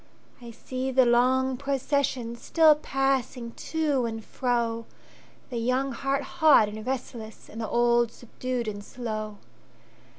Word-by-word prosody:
I 240 - -9
see 255 +3 -4
the 260 -1 +4
long 255 +2 +3
processionStill 280 +2 +2
passing 265 -4 -1
to 295 -3 -1
and 225 -1 -6
fro, 235 -3 -1 0.6
The 240 - -3
young 255 +3 0
heart 275 +3 -1
hot 300 -6 +5
and 215 +1 -7
restless, 235 -4 -5
And 225 - -7
the 220 - -3
old 240 -1 +3
subdued 245 0 -4
and 205 -1 -4
slow! 215 -2 -5
245 Hz, 125 wpm, -27 LUFS, 230-270 Hz, 0.6 s, hot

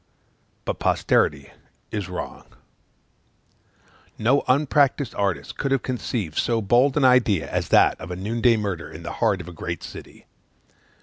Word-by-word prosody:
But - - -3
posterity 70 -2 +1 0.4
is 100 -4 -4
wrong; 90 - -7 1.7
no 125 +6 +2
unpractised 140 0 +2
artist 100 -3 -2
could 140 - -1
have 135 -2 +1
conceived 115 -9 -3
so 115 -1 +1
bold 120 +7 +3
an 140 - +3
idea 115 - +3
as - - -2
that - - +4
of 80 - -7
a 90 - -4
noon 110 +6 -3
day 120 -2 +5
murder 100 -6 -3
in - - -10
the - - -5
heart 95 - +2
of 85 - -11
a 90 - -9
great 85 0 -5
city. - - -11
110 Hz, 150 wpm, -23 LUFS, 90-130 Hz, 1.7 s, day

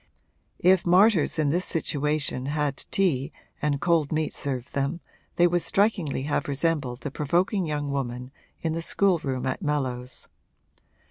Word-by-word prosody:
If 185 0 +4
martyrs 185 -1 +4
in 150 -3 +2
this 180 +4 0
situation 150 -4 0
had 145 -1 -1
tea 150 -9 +1 0.3
and 145 -1 0
cold 165 -3 +2
meat 155 -1 -1
served 130 -2 -4
them 140 +5 -1 0.4
they 175 - +5
would 175 0 +2
strikingly 190 -11 +1
have 145 - -1
resembled 140 -3 -1
the 145 - -4
provoking 175 +6 0
young 145 -2 -2
woman 125 -2 -3 0.3
in 160 -1 0
the 165 - -2
schoolroom 165 -8 0
at 130 - -2
Mellows. 130 -5 -3
150 Hz, 140 wpm, -26 LUFS, 140-170 Hz, 0.4 s, they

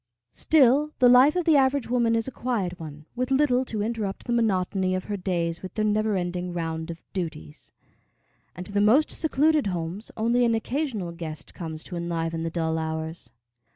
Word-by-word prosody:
Still 295 0 +3
the 250 - +5
life 255 +5 +7
of 360 -2 0
the 320 - +5
average 270 -1 +2
woman 235 -2 +2
is 225 +1 0
a - - -4
quiet 210 -8 -2
one, 150 -2 -9
with 255 +1 -1
little 265 -2 +3
to 215 -4 -3
interrupt 215 -3 -3
the 240 - -1
monotony 190 -4 +1
of 185 - -3
her 205 - -4
days 175 -3 -2
with 185 -1 -8
their 215 - 0
never 215 0 +1
ending 180 -1 -3
round 160 -1 -3
of 170 0 -6
duties; 155 - -6 0.8
and 180 - -7
to 200 - -4
the 205 0 +1
most 240 +9 +4
secluded 310 -4 +2
homes 180 +3 -4
only 235 +2 +2
an 230 -1 +3
occasional 225 - -2
guest 160 -3 -8
comes 160 -2 -7
to 180 - -8
enliven 165 -1 -2
the 165 - -2
dull 160 -1 -1
hours. 160 +1 -4
200 Hz, 190 wpm, -25 LUFS, 170-245 Hz, 0.8 s, life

